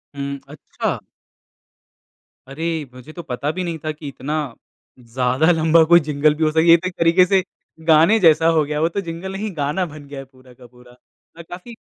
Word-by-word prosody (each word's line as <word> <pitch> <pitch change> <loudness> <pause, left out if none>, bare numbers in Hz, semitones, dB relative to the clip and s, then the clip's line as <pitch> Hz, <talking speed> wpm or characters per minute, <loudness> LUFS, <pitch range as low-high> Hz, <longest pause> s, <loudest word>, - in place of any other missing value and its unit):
हुँ, 140 0 -5
अच्छा। 150 - -5 1.5
अरे! 160 +2 -4
मुझे 125 +4 -13
तो 175 - -8
पता 135 +4 -3
भी 185 +3 -4
नहीं 170 -2 -4
था 155 - -1
कि 150 0 -10
इतना 140 +2 -5 0.6
ज़्यादा 125 +6 0
लंबा 160 0 +4
कोई 170 - +9
जिंगल 150 +1 +2
भी 160 - -2
हो 155 - +2
स 155 - -8
ये 170 - +9
तो 185 +2 -5
एक 185 - -6
तरीके 170 +2 +4
से 190 0 +2 0.4
गाने 165 +8 +5
जैसा 165 -3 +4
हो 155 - +3
गया 150 0 -3
वो 165 - +2
तो 200 - -3
जिंगल 170 +3 -6
नहीं 205 +2 -5
गाना 150 +6 -1
बन 150 -3 -11
गया 140 -1 -8
है 135 - -9
पूरा 130 -1 -20
का 125 0 -17
पूरा, 125 0 -20 0.5
अ, - - -9
काफ़ी 180 +7 -11
155 Hz, 200 wpm, -20 LUFS, 140-170 Hz, 1.5 s, कोई